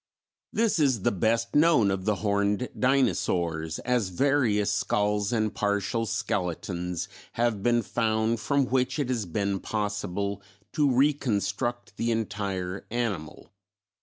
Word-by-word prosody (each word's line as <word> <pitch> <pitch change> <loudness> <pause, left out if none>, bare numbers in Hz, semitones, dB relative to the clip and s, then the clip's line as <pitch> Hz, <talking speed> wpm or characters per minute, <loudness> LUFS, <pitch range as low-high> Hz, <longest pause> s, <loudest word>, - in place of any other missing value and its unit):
This 225 -5 +1
is 130 -9 +2
the - - +3
best 115 +4 0
known 150 -10 +5
of 95 -1 -3
the 105 -1 +2
Horned 100 +3 +1
Dinosaurs, 85 - +1
as 125 -6 +1
various 105 -2 +2
skulls 105 0 0
and 110 -3 0
partial 105 +2 0
skeletons 90 -3 -2 0.3
have 115 -4 0
been 120 +1 +2
found 110 +1 0
from 140 +6 +1
which 125 +2 0
it 140 -4 -1
has 115 -6 -1
been 100 +2 -1
possible 100 -1 -2 0.3
to 145 -3 +3
reconstruct 120 -4 0
the 115 - 0
entire 100 -4 -2
animal. 110 -10 -3
110 Hz, 125 wpm, -27 LUFS, 100-120 Hz, 0.3 s, known